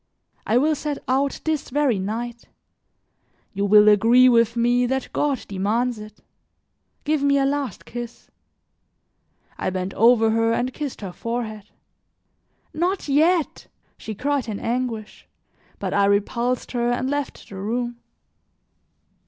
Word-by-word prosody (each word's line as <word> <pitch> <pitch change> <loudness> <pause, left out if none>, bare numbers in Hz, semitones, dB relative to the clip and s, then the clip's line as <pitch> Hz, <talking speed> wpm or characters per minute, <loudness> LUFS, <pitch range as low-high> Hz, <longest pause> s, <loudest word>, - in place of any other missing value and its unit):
I 225 - +3
will 305 +5 +3
set 295 -1 -3
out 270 +2 0
this 315 -2 -2
very 275 -6 +1
night; 235 +4 -4 1.1
you 200 0 -1
will 210 +1 +6
agree 230 +5 +6
with 230 -1 +3
me 245 +1 +2
that 265 +1 -3
God 285 -4 -1
demands 215 +5 -1
it. 215 0 -12 0.8
Give 300 -1 0
me 280 0 +3
a 275 - +2
last 280 -1 -2
kiss." 240 -1 -8 1.3
I - - -1
bent 185 +1 -3
over 225 -1 +4
her 225 0 +2
and 250 +2 -1
kissed 290 -6 -5
her 195 -3 -5
forehead. 220 -1 -5 1.0
"Not 355 +3 -1
yet," 315 +3 +1 0.3
she 220 - -7
cried 280 +2 -1
in 205 - -4
anguish. 235 -3 -4 0.5
But - - -4
I 200 0 +3
repulsed 235 +5 0
her 240 -1 0
and 250 +1 -1
left 285 0 -4
the 195 - -10
room. 240 +4 -3
240 Hz, 135 wpm, -23 LUFS, 215-275 Hz, 1.3 s, will